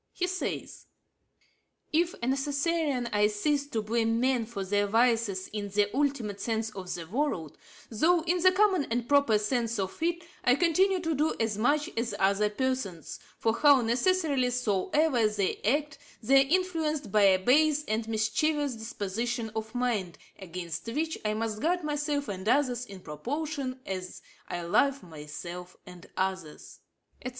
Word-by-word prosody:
He 360 - -1
says: 370 +1 -4 1.1
'If 340 +2 +2
as - - -19
a - - 0
Necessarian 280 0 0
I 210 0 +4
cease 280 +7 0
to 225 -6 -2
blame 225 +1 +1
men 250 -2 +1
for 200 -4 -5
their 205 +1 +1
vices 225 -3 +2
in 205 -1 -4
the 205 +2 0
ultimate 255 -8 -1
sense 225 -1 -1
of 190 -3 -7
the 170 - -6
word, 185 - -2 0.4
though, 320 +9 +3
in 355 +2 +1
the 370 +1 +6
common 375 -5 +3
and 235 +1 -2
proper 280 -6 +4
sense 230 +2 -1
of 190 -1 -3
it, 340 +1 0 0.2
I 250 0 +5
continue 365 +4 +2
to 325 -1 -1
do 305 +2 +1
as 225 -2 0
much 290 +6 +2
as 230 +1 -2
other 200 +2 +2
persons 210 - -3 0.2
(for 225 - +1
how 285 +1 +6
necessarily 265 +2 +1
soever 245 +3 +1
they 205 -3 -1
act, 285 +5 -1 0.2
they 270 +4 +5
are - - -14
influenced 320 - 0
by 210 - +4
a 195 -2 +6
base 295 +8 +3
and 220 +1 -1
mischievous 265 +7 0
disposition 225 +1 -3
of 220 +2 -5
mind, 225 -8 -1 0.2
against 175 -1 -6
which 310 +7 -2
I 215 0 0
must 220 -1 -3
guard 350 +3 +1
myself 295 -1 -1
and 195 +1 -3
others 250 -3 +1
in 195 -2 -10
proportion 265 - -4
as 185 -1 -6 0.2
I 175 0 -4
love 275 +11 +2
myself 170 +3 -8
and 180 -2 -12
others),' 185 -5 -4 0.4
&c. 255 - -3
235 Hz, 160 wpm, -29 LUFS, 205-290 Hz, 1.1 s, the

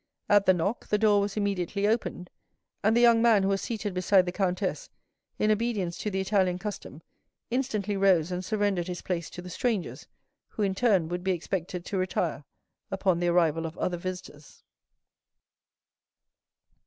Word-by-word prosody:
At 205 -1 +4
the 185 - +7
knock, 195 +7 -2
the 210 - +2
door 205 -1 +4
was 200 +1 -3
immediately 200 -1 -1
opened, 215 -5 -2 0.5
and 220 +3 +3
the - - +4
young 235 -1 +6
man 225 -4 +5
who 195 - +1
was 195 0 0
seated 210 -4 -3
beside 185 +1 +3
the 180 - -2
countess, 190 - -2 0.5
in 215 - +2
obedience 210 -6 -1
to 210 - -2
the 190 -1 -2
Italian 190 -2 +1
custom, 180 -6 -7 0.5
instantly 215 -6 -1
rose 185 -4 +3
and 180 +1 -3
surrendered 205 -4 0
his 180 -1 -5
place 170 -3 -3
to 180 - -9
the 180 - -8
strangers, 225 -2 -2 0.4
who, 215 - -4
in 195 -1 +1
turn, 195 -6 +2
would 175 0 -4
be 190 0 +1
expected 175 0 -4
to 195 - -2
retire 175 -5 -2 0.4
upon 190 -3 +1
the 175 - 0
arrival 165 -2 +2
of 160 - -10
other 180 -1 -1
visitors. 175 -5 -8
190 Hz, 165 wpm, -27 LUFS, 180-210 Hz, 0.5 s, the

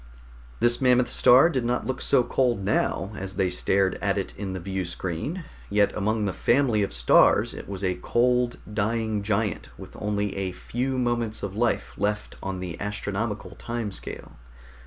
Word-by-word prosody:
This 120 +1 +3
mammoth 125 -1 +4
star 130 +6 +6
did 135 -8 -1
not 120 +1 -1
look 130 0 -3
so 130 -3 +4
cold 120 -5 0
now, 100 -1 0
as 95 -1 -6
they 95 -1 +1
stared 95 -1 +1
at - - +1
it - - -3
in 95 +3 -5
the 95 - -4
viewscreen, 95 - -4 0.3
yet 105 0 +3
among 110 +1 0
the 95 - -1
family 120 -4 +2
of 100 - -1
stars - - +4
it - - -9
was 100 -1 -5
a 90 -1 +1
cold, 125 0 +2 0.2
dying 110 0 0
giant 105 0 -1
with - - -11
only 105 -1 -1
a 95 -2 -2
few 130 +7 -3
moments 120 -3 -1
of 100 -1 -4
life 120 +1 0
left 105 +1 -1
on 95 -1 -4
the 90 -3 -5
astronomical 105 0 -3
time 115 -3 -3
scale. - - -7
105 Hz, 170 wpm, -26 LUFS, 95-120 Hz, 0.3 s, star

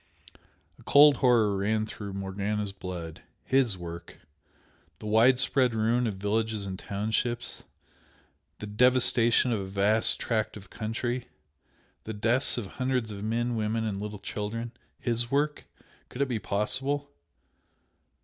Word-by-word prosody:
A - - -16
cold 145 0 +7
horror 115 -6 +3
ran 110 +2 0
through 105 -2 -7
Morgana's 100 +1 -2
blood. 90 -4 -7 0.2
HIS 130 -7 +2
work! 85 -1 -8 0.8
the - - -11
widespread 125 +3 +4
ruin 115 +2 +2
of 105 - -3
villages 105 +1 -1
and 95 -1 -5
townships, 110 +4 -2 0.9
the - - -7
devastation 120 +2 +3
of 110 - 0
a 95 - -4
vast 100 +3 +2
tract 110 -2 -1
of 95 -2 -14
country 120 +3 -3 0.8
the 110 - -5
deaths 120 +5 +1
of 120 - -3
hundreds 125 +1 -2
of 100 -1 -7
men, 120 +2 0
women 110 +1 -1
and 100 -2 -3
little 105 0 -5
children 110 +4 -4 0.3
HIS 120 -1 -1
work? 145 +2 0 0.4
Could 135 - -1
it - - -2
be 120 -3 -1
possible? 135 +9 -1
110 Hz, 130 wpm, -28 LUFS, 100-120 Hz, 0.9 s, cold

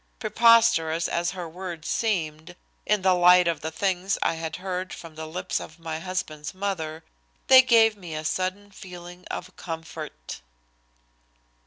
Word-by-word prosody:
Preposterous 215 -8 +4
as 175 +1 -1
her 180 -2 -6
words 170 -1 -7
seemed 170 -6 -2 0.3
in 210 -2 +2
the 190 -1 +5
light 180 0 +6
of 170 - -1
the 160 - -3
things 190 +3 -1
I - - +1
had 160 -1 -5
heard 185 0 -4
from 165 -2 -10
the 160 0 -7
lips 180 +3 -3
of 160 - -10
my 165 -1 -5
husband's 165 -3 -5
mother, 165 -5 -3 0.4
they 260 0 +9
gave 225 -4 +5
me 175 -6 -8
a 155 0 -5
sudden 185 +4 -2
feeling 180 -1 -11
of 185 - -6
comfort. 160 - -7
180 Hz, 150 wpm, -25 LUFS, 160-190 Hz, 0.4 s, they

